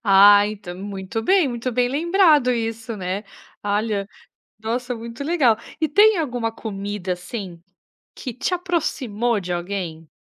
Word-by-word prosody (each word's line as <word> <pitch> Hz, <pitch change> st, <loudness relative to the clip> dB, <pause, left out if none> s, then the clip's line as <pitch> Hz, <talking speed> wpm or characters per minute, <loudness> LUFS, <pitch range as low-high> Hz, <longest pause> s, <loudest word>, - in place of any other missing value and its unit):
Ah, 205 Hz, 0 st, +7 dB
então 205 Hz, -4 st, -7 dB
muito 195 Hz, +3 st, -5 dB
bem, 370 Hz, -, +4 dB
muito 240 Hz, 0 st, -3 dB
bem 245 Hz, +1 st, +2 dB
lembrado 310 Hz, -2 st, +4 dB
isso, 225 Hz, -1 st, -3 dB
né? 190 Hz, +2 st, -3 dB, 0.4 s
Olha! 205 Hz, -1 st, -1 dB, 0.5 s
Nossa! 245 Hz, +3 st, -2 dB
Muito 230 Hz, +3 st, -7 dB
legal. 285 Hz, -9 st, +3 dB, 0.2 s
E 315 Hz, -, +2 dB
tem 415 Hz, +7 st, +6 dB
alguma 245 Hz, -7 st, -1 dB
comida, 200 Hz, -4 st, -4 dB
assim, 180 Hz, -1 st, -7 dB, 0.5 s
que 255 Hz, -, -6 dB
te 315 Hz, +8 st, -1 dB
aproximou 260 Hz, -, -1 dB
de 180 Hz, -1 st, -4 dB
alguém? 175 Hz, -3 st, -4 dB
225 Hz, 135 wpm, -22 LUFS, 200-255 Hz, 0.5 s, Ah